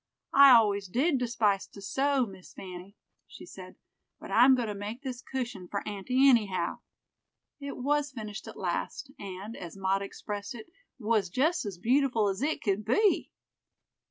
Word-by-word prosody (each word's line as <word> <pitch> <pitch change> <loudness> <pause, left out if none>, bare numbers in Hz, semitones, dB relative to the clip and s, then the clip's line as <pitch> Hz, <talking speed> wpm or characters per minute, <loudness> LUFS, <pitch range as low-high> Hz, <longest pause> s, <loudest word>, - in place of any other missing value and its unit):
"I 280 0 +9
always 205 -3 +3
did 270 - +1
despise 220 -5 +1
to - - -14
sew, 265 +6 +1
Miss 190 -3 -13
Fanny," 185 +1 -10 0.3
she - - -12
said, - - -11 0.4
"but - - -10
I'm 255 +3 +6
going 245 -3 -2
to - - -2
make 210 +6 -6
this 255 -2 -5
cushion 240 -9 -5
for 200 - -4
aunty 250 +7 +2
anyhow." 215 -8 +2 0.8
It 280 -1 -6
was 290 +2 0
finished 215 -4 -7
at - - -9
last, - - -3
and, 200 +3 -7
as 175 +1 -9
Maud 195 0 0
expressed 205 +2 -6
it, 225 - -9 0.3
"was 215 -5 0
just 310 - +1
as 195 -3 -6
beautiful 240 0 +2
as 195 +1 -3
it 305 +3 -1
could 205 -1 0
be." 390 - +2
220 Hz, 160 wpm, -29 LUFS, 200-265 Hz, 0.8 s, I